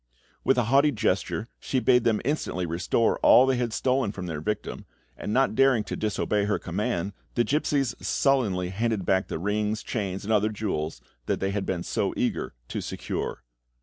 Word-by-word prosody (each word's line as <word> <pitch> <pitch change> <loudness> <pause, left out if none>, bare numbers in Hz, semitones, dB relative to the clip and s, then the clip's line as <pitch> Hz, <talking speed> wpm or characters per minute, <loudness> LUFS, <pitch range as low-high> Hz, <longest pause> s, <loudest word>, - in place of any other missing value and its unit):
With 135 - +3
a 125 - +3
haughty 140 +6 +4
gesture 105 -1 -1
she 130 - -1
bade 125 -1 +3
them 110 -3 +2
instantly 130 - -1
restore 85 +7 +1
all 130 - +7
they 130 -1 +2
had 120 -2 -1
stolen 130 -1 +1
from 95 -3 -6
their 80 -4 -4
victim, 105 +4 -4 0.3
and 105 - -5
not 135 +1 +3
daring 130 -2 +4
to - - -5
disobey 105 -1 0
her 105 - +1
command, 95 +1 -2 0.2
the 120 - +3
gipsies 140 -2 +1
sullenly 105 -10 +1
handed 105 0 -1
back 95 +1 +2
the - - -3
rings, 105 +4 -1
chains, 100 -4 -3
and 110 +2 0
other 105 0 +3
jewels 90 - -3 0.3
they 95 0 0
had 100 -1 -2
been 90 -2 -1
so - - -1
eager - - -1
to - - -3
secure. - - -4
105 Hz, 180 wpm, -26 LUFS, 95-125 Hz, 0.3 s, all